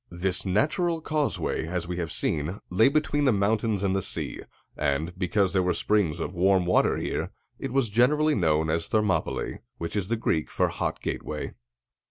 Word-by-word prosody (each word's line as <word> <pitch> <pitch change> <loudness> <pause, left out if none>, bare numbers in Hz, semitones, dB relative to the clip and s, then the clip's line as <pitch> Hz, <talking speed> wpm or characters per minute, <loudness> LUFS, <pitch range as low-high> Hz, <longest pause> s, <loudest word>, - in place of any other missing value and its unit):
This 90 +2 -2
natural 160 - +1
causeway, 155 - -1
as 85 0 -3
we 90 0 -4
have 85 -3 -3
seen, 80 +6 -1
lay 110 +8 +5
between 145 0 +1
the 130 - +5
mountains 105 0 +1
and 95 -1 +1
the 95 - +1
sea; - - -4 0.4
and, 75 +4 -1
because 95 +1 +1
there 95 - +3
were 90 0 +1
springs 95 -7 +1
of 85 - -3
warm 95 0 +3
water 90 - +3
here, - - -2 0.3
it 135 - -4
was 135 -2 +2
generally 145 +8 +3
known 80 - +2
as 80 +1 -1
Thermopylæ, 105 -3 0 0.2
which 85 +3 -4
is 100 -3 -1
the 115 - +1
Greek 80 -8 0
for - - +1
"Hot - - -3
Gateway." - - -4
95 Hz, 180 wpm, -27 LUFS, 85-115 Hz, 0.4 s, lay